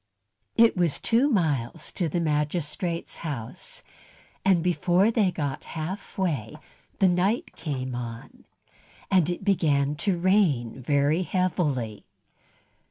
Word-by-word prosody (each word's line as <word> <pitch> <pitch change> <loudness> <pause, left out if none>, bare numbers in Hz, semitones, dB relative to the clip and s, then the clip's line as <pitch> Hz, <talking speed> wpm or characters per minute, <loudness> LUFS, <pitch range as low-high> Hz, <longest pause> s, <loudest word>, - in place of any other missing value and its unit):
It 230 0 +5
was 175 -5 +1
two 245 +5 +3
miles 155 - 0
to 170 -3 -1
the 175 - -1
magistrate's 160 +2 -2
house, 155 - -6 0.6
and 185 -4 +3
before 180 +3 +3
they 220 -3 +3
had 180 -2 0
got 145 -4 -3
half 180 +6 -5
way 145 - -1 0.4
the 195 - +4
night 185 +6 +1
came 130 -4 -4
on, 115 -2 -7 0.7
and 180 -4 +4
it 175 - -3
began 150 -8 +2
to 190 +2 0
rain 170 - +2
very 145 +5 +2
heavily. 155 - -1
170 Hz, 120 wpm, -26 LUFS, 140-185 Hz, 0.7 s, It